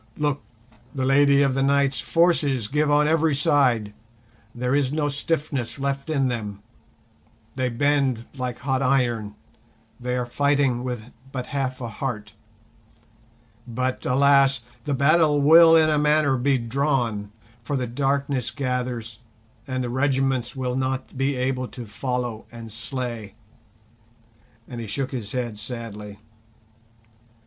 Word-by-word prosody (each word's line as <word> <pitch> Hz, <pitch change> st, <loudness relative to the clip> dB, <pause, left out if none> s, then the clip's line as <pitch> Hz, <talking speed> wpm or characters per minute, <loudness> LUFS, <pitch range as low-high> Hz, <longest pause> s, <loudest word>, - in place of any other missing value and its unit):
"Look, 145 Hz, -2 st, 0 dB, 0.5 s
the 130 Hz, -1 st, -1 dB
Lady 140 Hz, +1 st, +5 dB
of 135 Hz, -2 st, +2 dB
the 135 Hz, -, 0 dB
Night's 140 Hz, 0 st, +2 dB
forces 150 Hz, -9 st, +2 dB
give 150 Hz, +4 st, +1 dB
on 150 Hz, +1 st, +4 dB
every 160 Hz, -1 st, +2 dB
side, 130 Hz, -9 st, +2 dB, 0.6 s
there 125 Hz, +2 st, -1 dB
is 140 Hz, -2 st, +2 dB
no 150 Hz, -1 st, 0 dB
stiffness 145 Hz, -4 st, -2 dB
left 140 Hz, +2 st, -3 dB
in 140 Hz, -4 st, +1 dB
them, 105 Hz, -4 st, -4 dB, 0.9 s
they 130 Hz, -1 st, 0 dB
bend 130 Hz, -2 st, +1 dB
like 125 Hz, -2 st, -3 dB
hot 130 Hz, 0 st, -1 dB
iron, 120 Hz, -6 st, +1 dB, 0.6 s
they 125 Hz, 0 st, -2 dB
are 125 Hz, -, -1 dB
fighting 140 Hz, -1 st, +1 dB
with 125 Hz, -2 st, -5 dB, 0.2 s
but 125 Hz, -2 st, -4 dB
half 130 Hz, -2 st, -2 dB
a 120 Hz, -, -3 dB
heart. 110 Hz, -3 st, -5 dB, 1.3 s
But 125 Hz, +2 st, -2 dB
alas! 135 Hz, 0 st, +4 dB, 0.2 s
the 145 Hz, -2 st, 0 dB
battle 150 Hz, +2 st, +4 dB
will 165 Hz, +3 st, +8 dB
in 155 Hz, -1 st, +5 dB
a 150 Hz, -, +2 dB
manner 150 Hz, -2 st, +3 dB
be 135 Hz, +2 st, +2 dB
drawn, 120 Hz, -4 st, -1 dB, 0.3 s
for 135 Hz, +5 st, -2 dB
the 125 Hz, -, -1 dB
darkness 135 Hz, 0 st, -1 dB
gathers, 125 Hz, -5 st, -3 dB, 0.5 s
and 130 Hz, -1 st, -2 dB
the 120 Hz, -, -3 dB
regiments 135 Hz, -2 st, 0 dB
will 125 Hz, -1 st, -2 dB
not 130 Hz, 0 st, -2 dB
be 135 Hz, +1 st, 0 dB
able 130 Hz, 0 st, -1 dB
to 120 Hz, -1 st, -9 dB
follow 120 Hz, +1 st, -4 dB
and 115 Hz, -2 st, -9 dB
slay!"—and 115 Hz, -1 st, -5 dB, 1.5 s
he 115 Hz, -, -6 dB
shook 130 Hz, +6 st, -3 dB
his 115 Hz, -6 st, -5 dB
head 120 Hz, -4 st, -3 dB
sadly. 105 Hz, -3 st, -7 dB
130 Hz, 135 wpm, -24 LUFS, 120-140 Hz, 1.5 s, will